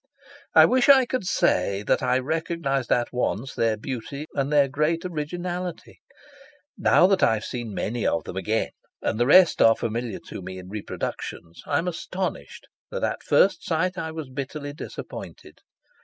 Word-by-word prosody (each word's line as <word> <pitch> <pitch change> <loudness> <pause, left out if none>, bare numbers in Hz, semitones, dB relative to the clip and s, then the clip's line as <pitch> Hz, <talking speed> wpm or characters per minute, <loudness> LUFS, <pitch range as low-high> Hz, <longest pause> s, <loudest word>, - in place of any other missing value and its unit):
I - - +9
wish 255 +1 +3
I 265 -2 +8
could 250 -4 -3
say 100 - +1
that - - +1
I 125 0 +2
recognised 140 -2 -2
at 120 0 +1
once 125 +1 -1
their 115 -1 +1
beauty 135 +5 -5
and 140 0 -1
their 145 -2 +5
great 150 +5 0
originality. 175 +2 -5 0.8
Now - - +4
that 190 0 +3
I 110 - +4
have 110 - -5
seen 120 -5 -5
many 120 +2 -1
of 80 - 0
them - - -8
again 110 +4 -1 0.3
and 110 - -1
the 120 - +3
rest 180 +4 +6
are 115 0 +7
familiar 115 -1 -3
to - - -8
me 95 +1 -7
in 90 0 -10
reproductions, 85 -4 -6
I 145 - +1
am 170 - -1
astonished 185 +2 -4 0.2
that - - -4
at - - -1
first 190 -4 +3
sight 180 +3 0
I 160 -4 -4
was 160 -4 -7
bitterly 145 +2 -5
disappointed. - - -9
140 Hz, 170 wpm, -25 LUFS, 115-170 Hz, 0.8 s, I